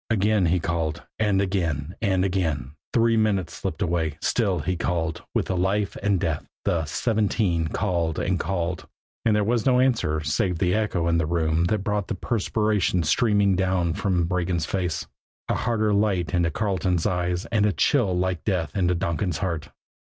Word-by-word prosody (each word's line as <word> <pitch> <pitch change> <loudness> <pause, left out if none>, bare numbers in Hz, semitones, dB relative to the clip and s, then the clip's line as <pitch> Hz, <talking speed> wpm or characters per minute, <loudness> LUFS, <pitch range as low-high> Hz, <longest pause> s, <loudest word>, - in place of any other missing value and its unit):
Again 105 -3 +2
he 90 +2 +2
called, 80 -1 -2 0.2
and 105 -3 +2
again, 85 -5 -2
and 95 -3 +2
again. 80 -9 -1 0.2
The 115 - +3 0.2
minutes 100 -6 +1
slipped 100 +2 -3
away. 80 -4 -1
Still - - +1
he 95 0 -1
called 85 -1 -2
with - - +2
the 95 - -2
life 95 +3 0
and 100 -3 +2
death 80 -2 -1 0.2
the 80 -2 +1
"seventeen" 100 -2 0
called 85 -3 -1
and 90 0 0
called. 90 0 -2 0.4
And 110 -2 +4
there 105 - +2
was 115 +3 +1
no 125 -1 +4
answer 115 -12 +2
save 85 +4 0
that 90 +1 +1
echo 105 -6 0
in 85 0 +2
the 80 - 0
room 80 0 +1
that 105 +1 0
brought 105 -2 -1
the 110 - -2
perspiration 105 -3 0
streaming 100 +3 +3
down 90 -2 +1
from 90 -3 0
Regan's 90 -2 -1
face, 90 -4 -2 0.4
a - - +1
harder 110 -3 0
light 100 -4 +1
into 85 -2 +2
Carleton's 90 -1 0
eyes 90 -2 0
and 105 -2 +3
a - - +2
chill 100 - +2
like 90 -1 -1
death 85 -8 -1
into 90 -2 +2
Donkin's 85 0 -1
heart. 85 -5 -3
90 Hz, 175 wpm, -24 LUFS, 85-105 Hz, 0.4 s, And